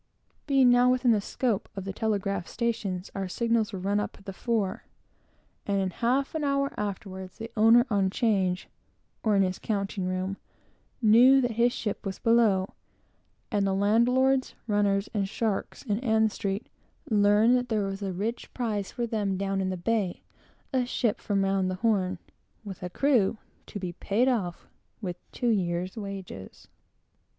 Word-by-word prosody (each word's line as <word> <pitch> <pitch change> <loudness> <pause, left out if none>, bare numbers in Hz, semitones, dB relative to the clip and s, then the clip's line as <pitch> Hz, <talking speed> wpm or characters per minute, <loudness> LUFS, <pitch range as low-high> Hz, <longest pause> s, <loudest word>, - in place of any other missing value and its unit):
Being 270 -3 +5
now 245 +1 +5
within 250 -1 +3
the 215 -2 +3
scope 225 0 -1
of 195 -1 -5
the 195 - -4
telegraph 200 -4 -1
stations, 215 -6 -3
our 195 -1 -3
signals 230 +2 0
were 195 - -5
run 200 +3 0
up 210 - -4
at 195 - -19
the 195 - -6
fore, 215 -2 -2 0.8
and 200 -1 +1
in 190 -1 -1
half 255 +8 0
an 315 -2 -2
hour 275 -1 0
afterwards, 190 -2 -5
the 225 0 -7
owner 225 +2 +6
on 195 -2 +2
'change, 190 -4 0 0.6
or 215 -2 +3
in 195 - +4
his 185 -1 -2
counting 200 -2 -2
room, 185 +1 -2 0.7
knew 245 +5 +7
that 245 -1 0
his 235 +2 +2
ship 210 -4 -4
was 195 -1 -4
below; 220 -5 +3 0.8
and 205 -3 +1
the 190 - +1
landlords, 250 +6 +2
runners, 205 -2 +1
and 200 -3 -1
sharks 215 -2 -2
in 210 -5 -1
Ann 220 -3 +2
street 200 +2 -3 0.5
learned 210 +3 +5
that 250 -1 -1
there 215 -3 +1
was 195 +1 -4
a 195 -1 -2
rich 215 +6 -4
prize 215 -5 -2
for 240 -1 -2
them 205 -4 -1
down 195 0 -1
in 190 - -1
the 185 - -3
bay: 200 0 -1 0.5
a 260 -1 +2
ship 240 -3 -1
from 200 -2 0
round 195 -1 +1
the 185 - -2
Horn, 190 -3 +1 0.5
with 195 -4 -8
a 180 - -4
crew 235 -2 +2 0.3
to 205 - -6
be 180 -2 -4
paid 215 +8 0
off 200 -9 -1 0.3
with 185 -5 -4
two 245 - -1
years' 180 -3 0
wages. 195 - -8
205 Hz, 170 wpm, -27 LUFS, 195-235 Hz, 0.8 s, knew